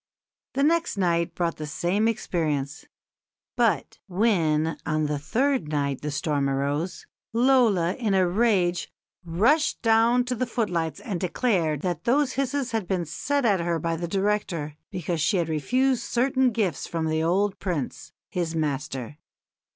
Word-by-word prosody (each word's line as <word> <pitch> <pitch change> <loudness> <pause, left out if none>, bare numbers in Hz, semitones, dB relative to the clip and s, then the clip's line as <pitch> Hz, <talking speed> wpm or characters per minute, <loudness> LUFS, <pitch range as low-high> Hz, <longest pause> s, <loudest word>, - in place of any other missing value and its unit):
The 275 - +2
next 335 -4 +2
night 170 -2 +1
brought 170 -2 -1
the 155 - -5
same 175 +8 0
experience; 155 -9 -2 0.7
but - - +1
when 165 -6 +1
on 155 -1 0
the 150 -1 -1
third 255 - 0
night 140 -3 -1
the 150 - -3
storm 145 -1 0
arose, 140 +6 -2 0.3
"Lola, 230 -8 +3
in 215 -4 0
a 185 -1 +4
rage, 180 -3 +1 0.3
rushed 225 - +2
down 230 +2 +4
to 250 - -2
the 250 +1 -2
footlights 175 - -2
and 195 -6 -4
declared 175 - 0
that 175 -3 -3
those 265 +2 +2
hisses 275 -2 -1
had 220 -5 -2
been 180 -3 -1
set 280 - -1
at 200 -5 +3
her 170 0 0
by 165 0 -1
the 170 +1 -4
director, 190 -6 -1
because 175 -2 -3
she 195 +5 +2
had 170 -2 0
refused 250 - +1
certain 260 +1 +2
gifts 205 - -1
from 165 -1 -2
the 160 0 0
old 190 +5 +1
Prince, 170 -9 -4 0.2
his 170 -3 -2
master. 145 -3 -3
180 Hz, 150 wpm, -25 LUFS, 160-230 Hz, 0.7 s, a